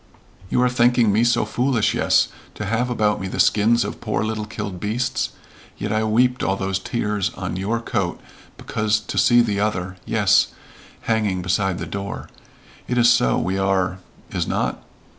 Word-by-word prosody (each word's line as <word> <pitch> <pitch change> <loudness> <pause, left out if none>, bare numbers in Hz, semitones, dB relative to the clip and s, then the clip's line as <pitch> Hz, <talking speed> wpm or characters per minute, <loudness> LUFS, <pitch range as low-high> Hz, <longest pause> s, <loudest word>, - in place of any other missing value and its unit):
"You 125 - +2
are - - +4
thinking 120 -2 +3
me 110 +3 +3
so 120 -2 +2
foolish, 125 0 +1
yes, - - +3 0.3
to 105 - -5
have 115 +4 0
about 105 -4 +1
me 95 - -3
the - - -5
skins 115 +3 +3
of - - -6
poor 110 -1 -1
little 110 -1 -3
killed 100 -4 -5
beasts? 115 +5 -1 0.5
Yet 105 +1 -3
I 110 0 +1
weeped 125 +4 +2
all 95 - +1
those 95 0 -2
tears 105 -1 -1
on 95 -2 -4
your 100 +5 -1
coat 115 - -2 0.4
because 110 0 0
to 105 - -3
see 120 0 +5
the 105 -4 0
other 95 -3 -2
yes, - - +3 0.5
hanging 105 -5 0
beside 95 0 0
the 85 - -4
door. 100 +4 -6 0.6
It 125 - -1
is 120 0 +6
so 60 - +2
we 95 +2 -1
are 95 -1 0 0.3
is - - -2
not?" - - -1
105 Hz, 175 wpm, -22 LUFS, 95-115 Hz, 0.6 s, is